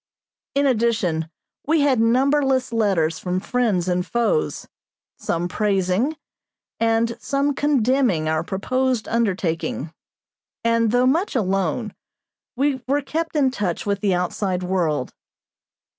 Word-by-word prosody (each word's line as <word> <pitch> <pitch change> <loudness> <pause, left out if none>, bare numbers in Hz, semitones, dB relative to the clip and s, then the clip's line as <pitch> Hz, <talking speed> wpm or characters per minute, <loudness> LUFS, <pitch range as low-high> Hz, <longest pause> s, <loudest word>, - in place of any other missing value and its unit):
In 280 0 +3
addition 220 - +1 0.4
we 315 0 +3
had 275 -4 +3
numberless 260 +2 +2
letters 190 -8 +1
from 180 0 -2
friends 205 -5 0
and 180 0 +1
foes, 235 - -1 0.5
some 170 +1 -1
praising 200 - 0 0.6
and 230 0 +1
some 280 +1 0
condemning 255 - +1
our 155 0 0
proposed 255 +6 -1
undertaking, 180 -8 -1 0.7
and, 230 -1 +2
though 245 +3 +3
much 320 +9 +1
alone, 195 0 0 0.6
we 270 0 0
were 285 +2 +1
kept 325 +4 -3
in 275 -3 +3
touch 200 -8 -2
with 200 -1 0
the 200 -3 +2
outside 180 +1 -1
world. 165 -8 -1
225 Hz, 115 wpm, -22 LUFS, 180-260 Hz, 0.7 s, In